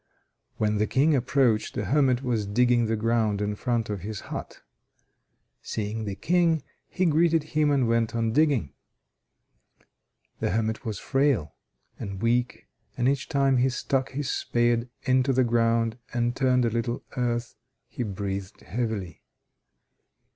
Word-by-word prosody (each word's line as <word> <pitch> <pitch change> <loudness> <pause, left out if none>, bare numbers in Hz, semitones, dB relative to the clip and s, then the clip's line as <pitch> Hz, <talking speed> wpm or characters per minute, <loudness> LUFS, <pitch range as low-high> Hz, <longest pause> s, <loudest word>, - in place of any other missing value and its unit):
When 105 -1 +1
the 105 - +2
King 150 +4 +3
approached, 125 -3 +1
the 105 - -2
hermit 130 +1 +2
was 115 -5 -1
digging 120 +2 +3
the 115 - 0
ground 110 -2 +1
in 105 0 -1
front 115 0 -1
of 105 -3 -4
his 105 +2 -5
hut. - - -7 1.0
Seeing 110 +1 -4
the 100 -2 -4
King, 165 - +2 0.3
he 185 +1 0
greeted 165 0 +3
him 150 -1 +3
and 135 -4 +2
went 115 0 +1
on 115 -1 +1
digging. 140 - +2 1.7
The - - 0
hermit 110 +2 -1
was 110 -3 -3
frail 135 - +1 0.5
and 100 -1 -5
weak, 120 +3 0 0.3
and 120 - +1
each 135 0 0
time 135 -3 +2
he 125 +2 +3
stuck 130 +1 -1
his 140 0 -3
spade 120 0 +1
into 130 0 +2
the 130 0 +3
ground 115 0 +1
and 120 0 0
turned 130 -2 +2
a 115 - +1
little 120 +1 -2
earth, 120 -1 -1 0.3
he - - -7
breathed 100 -3 -4
heavily. 105 -5 -4
120 Hz, 145 wpm, -26 LUFS, 110-130 Hz, 1.7 s, King